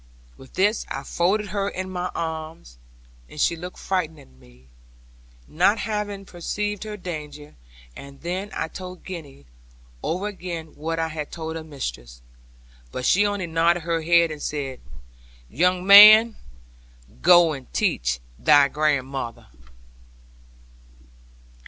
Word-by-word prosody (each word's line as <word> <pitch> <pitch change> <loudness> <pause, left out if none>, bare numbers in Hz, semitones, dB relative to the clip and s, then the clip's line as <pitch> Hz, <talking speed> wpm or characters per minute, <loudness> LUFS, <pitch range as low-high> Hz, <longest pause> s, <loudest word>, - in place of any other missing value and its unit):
With 130 - -16
this 205 +4 +2
I 135 - -5
folded 195 +8 0
her 200 +1 -2
in 185 -1 -6
my 180 0 -3
arms; 160 - -6 0.5
and 150 - -11
she 170 - +2
looked 180 +2 -9
frightened 165 -5 -2
at 65 - -18
me; 65 0 -21 0.8
not 185 +7 +2
having 210 -3 -4
perceived 205 +4 -4
her 210 -1 -6
danger; 150 -5 -8 0.4
and 140 0 -12
then 185 +4 -4
I - - -2
told 180 +1 -10
Gwenny 150 - -9 0.6
over 180 +5 -2
again 175 -6 -6
what 165 +2 -4
I 165 0 -1
had 155 -2 -6
told 160 -1 -6
her 165 - -6
mistress: - - -7 0.7
but 125 - -5
she 205 +7 +4
only 205 -3 -2
nodded 165 +1 +1
her 165 0 -1
head 170 0 +3
and 150 -1 -8
said, 135 -4 -4 0.7
'Young 180 +6 +1
man, 215 +3 +9 0.9
go 175 -2 +6
and 135 -3 -10
teach - - 0 0.2
thy 145 -2 +5
grandmother.' 135 -5 -2
165 Hz, 130 wpm, -23 LUFS, 145-185 Hz, 0.9 s, man